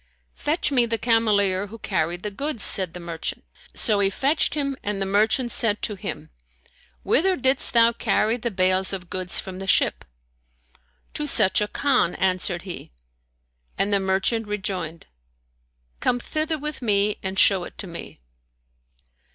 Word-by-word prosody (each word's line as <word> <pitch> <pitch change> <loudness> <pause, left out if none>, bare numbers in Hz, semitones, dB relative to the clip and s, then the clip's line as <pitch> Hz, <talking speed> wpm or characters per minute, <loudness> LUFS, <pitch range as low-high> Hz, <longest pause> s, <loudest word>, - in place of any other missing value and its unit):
"Fetch 300 +1 0
me 245 -3 +3
the 230 0 -1
cameleer 205 -5 +2
who 225 +3 -10
carried 175 -4 -2
the 210 - -3
goods," 275 +2 -3
said 185 -4 +1
the - - -6
merchant; 170 -2 -4 0.3
so 215 -4 +1
he 195 -1 +4
fetched 275 +12 +1
him 280 -2 -1
and 205 -1 -3
the 195 - -1
merchant 220 +5 +1
said 215 -3 0
to 215 - -1
him, 190 - -7 0.7
"Whither 375 +5 +2
didst 265 -1 +2
thou 230 0 +5
carry 225 -1 +1
the 235 0 -3
bales 185 -1 +1
of 180 -2 -6
goods 185 -1 +1
from 185 -1 -7
the 195 - -6
ship?" - - +2 1.1
"To 300 - -3
such 190 -8 +5
a 210 - 0
Khan," 250 -7 +1
answered 185 -1 -1
he; 185 - -8 0.9
and 205 +1 0
the 200 - +4
merchant 195 +4 0
rejoined, 190 -6 -4 0.9
"Come 245 - 0
thither 310 +5 -2
with 300 -1 -5
me 210 -2 +1
and 190 0 -4
show 190 -1 +4
it - - -11
to - - -6
me." 170 - -9
205 Hz, 160 wpm, -23 LUFS, 190-240 Hz, 1.1 s, thou